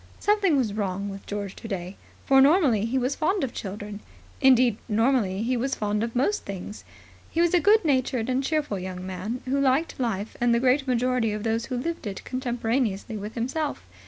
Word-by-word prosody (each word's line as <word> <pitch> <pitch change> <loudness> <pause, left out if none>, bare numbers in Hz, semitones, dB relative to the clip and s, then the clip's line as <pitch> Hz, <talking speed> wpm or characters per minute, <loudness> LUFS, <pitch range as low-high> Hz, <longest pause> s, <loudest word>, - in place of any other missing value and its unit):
Something 410 -7 +3
was 230 -6 0
wrong 200 -1 -2
with 195 0 -9
George 200 -2 -4
today, 190 -4 -5 0.3
for 270 0 +6
normally 275 - +4
he 240 +3 -1
was 255 +2 0
fond 370 +3 0
of 260 - -2
children. 205 +1 -6 0.4
Indeed, 255 -4 +5
normally 220 -3 +2
he 250 +2 0
was 265 +3 -1
fond 210 0 -1
of 230 +1 -4
most 285 +12 +1
things. 200 +1 -7 0.5
He 330 - -3
was 345 0 +3
a 355 - +6
good 420 +2 +4
natured 255 -5 +1
and 260 +1 0
cheerful 295 -9 -1
young 185 0 -6
man, 190 +6 -5
who 270 +2 0
liked 275 +4 +1
life 220 -4 -2
and 240 -1 +4
the - - +3
great 265 +2 +2
majority 250 -3 +1
of 210 0 -4
those 225 +1 0
who 255 - -3
lived 330 -1 -3
it 195 - -6
contemporaneously 240 -4 -2
with 210 +1 -6
himself. 275 +6 -2
240 Hz, 190 wpm, -26 LUFS, 210-270 Hz, 0.5 s, for